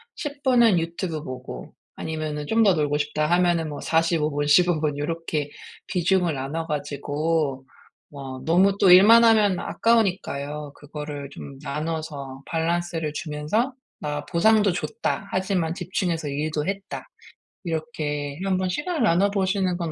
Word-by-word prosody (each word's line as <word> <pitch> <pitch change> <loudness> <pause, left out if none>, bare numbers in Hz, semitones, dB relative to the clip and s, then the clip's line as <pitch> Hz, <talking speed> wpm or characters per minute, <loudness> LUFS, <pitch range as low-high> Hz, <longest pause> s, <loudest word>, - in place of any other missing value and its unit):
10 290 -2 -6
분은 240 -7 +5
유튜브 165 -1 -3
보고 130 - -8 0.2
아니면은 155 -2 -4
좀 225 +7 +2
더 195 -4 +5
놀고 150 -1 0
싶다 150 +1 -1
하면은 175 -1 +2
뭐 145 - -6
45 165 -1 +1
분, 145 0 -1
15 175 +2 +4
분 150 -2 0
요렇게 150 -1 -3 0.4
비중을 180 -3 +1
나눠 150 +5 -4
가지고 145 -1 -2 0.5
마 140 - -10 0.3
너무 190 +4 +4
또 190 -3 +6
일만 220 +6 +8
하면 210 -5 +4
아까우니까요. 150 -10 0
그거를 145 -1 -7
좀 140 -1 -10
나눠서 150 -3 -4
밸런스를 165 -1 -1
주면서 155 - -1 0.3
'나 150 0 -3
보상도 205 +3 +3
줬다. 200 +2 -3
하지만 185 -3 0
집중해서 175 -3 -2
일도 150 +1 -2
했다.' 195 0 -5 0.6
이렇게 150 -3 -3
한번 185 -1 0
시간을 300 - -1
나눠 200 0 +3
보시는 190 -2 0
건 170 -3 -3
165 Hz, 280 characters per minute, -24 LUFS, 150-190 Hz, 0.6 s, 일만